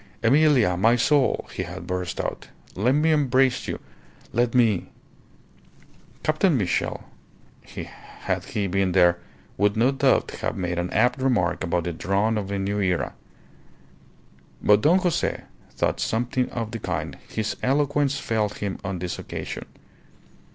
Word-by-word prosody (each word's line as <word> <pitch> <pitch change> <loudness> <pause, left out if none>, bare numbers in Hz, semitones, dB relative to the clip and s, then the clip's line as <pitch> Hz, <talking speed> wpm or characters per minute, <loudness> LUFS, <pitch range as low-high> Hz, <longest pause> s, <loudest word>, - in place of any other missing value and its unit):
"Emilia, 130 - +4
my 110 +6 +4
soul," 135 +2 +2
he - - -3
had 90 0 -7
burst 90 -1 -3
out, - - -4 0.3
"let 115 +7 +2
me 155 +2 +3
embrace 135 -3 +2
you! - - -3 0.5
Let 120 +1 +1
me 110 -7 +3 0.7
" - - -28
Captain 155 0 +2
Mitchell, 95 -6 -1 1.2
had - - -1
he 105 - -2
been 95 -1 0
there, 85 -2 +4 0.4
would 105 +1 +2
no 120 +4 +4
doubt 135 -1 +2
have - - -2
made 90 -2 -2
an 90 +1 -2
apt 125 +6 +2
remark 105 -11 +1
about 85 -1 0
the 85 +1 -3
dawn 100 +5 0
of 100 -2 -5
a 100 - -2
new 100 +1 -1
era; 90 -3 0 1.5
but 105 - +4
if - - -9
Don 165 +9 +5
Jose 180 -3 0 0.3
thought - - -1
something 125 +3 0
of 115 -2 -4
the 115 - -5
kind, - - -3
his 110 -1 -3
eloquence 145 +1 +1
failed 110 -5 -1
him 100 -2 -4
on 95 -1 -3
this 90 0 -4
occasion. - - -6
110 Hz, 150 wpm, -24 LUFS, 95-130 Hz, 1.5 s, Don